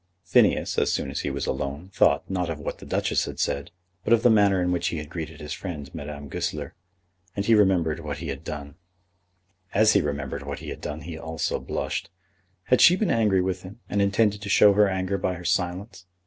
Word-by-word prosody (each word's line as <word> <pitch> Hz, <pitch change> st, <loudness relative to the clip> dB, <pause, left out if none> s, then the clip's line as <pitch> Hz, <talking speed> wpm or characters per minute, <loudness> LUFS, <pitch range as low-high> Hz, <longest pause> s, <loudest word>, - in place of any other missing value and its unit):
Phineas, -, -, +3 dB
as -, -, +1 dB
soon -, -, -2 dB
as -, -, -3 dB
he -, -, -2 dB
was -, -, -3 dB
alone, 75 Hz, +8 st, -4 dB
thought, -, -, +3 dB
not 90 Hz, -3 st, -2 dB
of 80 Hz, -, -3 dB
what 75 Hz, -, -5 dB
the -, -, -11 dB
Duchess -, -, 0 dB
had -, -, -7 dB
said, 70 Hz, +4 st, -1 dB, 0.3 s
but 115 Hz, -, +3 dB
of 115 Hz, 0 st, +3 dB
the 120 Hz, -, +6 dB
manner 100 Hz, -3 st, +4 dB
in 90 Hz, 0 st, +1 dB
which 90 Hz, -, 0 dB
he 85 Hz, -, -2 dB
had 75 Hz, 0 st, -7 dB
greeted 80 Hz, -3 st, -6 dB
his 75 Hz, +1 st, -5 dB
friend, 75 Hz, -7 st, -6 dB
Madame 70 Hz, 0 st, -7 dB
Goesler. -, -, -4 dB, 0.6 s
As 100 Hz, -, -2 dB
he 115 Hz, -, +4 dB
remembered 90 Hz, -7 st, +3 dB
what 75 Hz, -3 st, -5 dB
he 75 Hz, 0 st, -6 dB
had 70 Hz, +2 st, -5 dB
done, 70 Hz, -2 st, -6 dB, 1.0 s
he 80 Hz, -4 st, -1 dB
also 80 Hz, 0 st, -2 dB
blushed. -, -, -3 dB, 0.5 s
Had 125 Hz, -, +3 dB
she 175 Hz, -, +8 dB
been 210 Hz, 0 st, 0 dB
angry 105 Hz, -5 st, +3 dB
with 95 Hz, -1 st, -2 dB
him, 95 Hz, +5 st, -11 dB
and 100 Hz, -, 0 dB
intended 100 Hz, +1 st, +2 dB
to 100 Hz, -, -6 dB
show 105 Hz, 0 st, +6 dB
her 105 Hz, 0 st, +4 dB
anger 95 Hz, +1 st, -1 dB
by 90 Hz, 0 st, -1 dB
her 90 Hz, +1 st, -10 dB
silence? 90 Hz, +1 st, -2 dB
90 Hz, 195 wpm, -25 LUFS, 75-100 Hz, 1.0 s, she